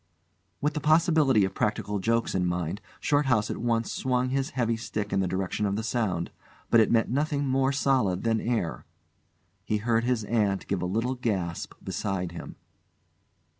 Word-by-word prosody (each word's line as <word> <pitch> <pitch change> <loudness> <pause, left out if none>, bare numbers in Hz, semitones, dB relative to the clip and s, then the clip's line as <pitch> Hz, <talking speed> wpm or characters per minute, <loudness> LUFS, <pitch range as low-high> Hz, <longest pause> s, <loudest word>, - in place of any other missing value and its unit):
With 150 +2 +1
the 150 - -2
possibility 155 - +4
of 95 - -4
practical 105 0 -1
jokes 115 +3 0
in 95 - +1
his 90 - +1
mind, 90 +3 -2 0.2
Shorthouse 135 -7 +2
at - - -4
once 115 -1 0
swung 125 0 0
his 135 +1 0
heavy 115 -2 +1
stick 105 -2 -4
in - - +2
the 95 - +1
direction 95 +3 -1
of 100 - -1
the 110 - -2
sound; 110 -7 -1 0.4
but 115 - +7
it 110 - +4
met 115 -1 +2
nothing 145 +1 0
more 135 0 +2
solid 130 -10 +1
than 115 -1 +1
air. 115 -8 -1 0.8
He 105 - 0
heard 115 +2 +1
his 120 -2 0
aunt 105 -3 0
give 95 -3 -2
a 90 - -1
little 115 +7 0
gasp 95 -9 -3
beside 95 -4 -2
him. 85 - -8
115 Hz, 175 wpm, -27 LUFS, 95-130 Hz, 0.8 s, but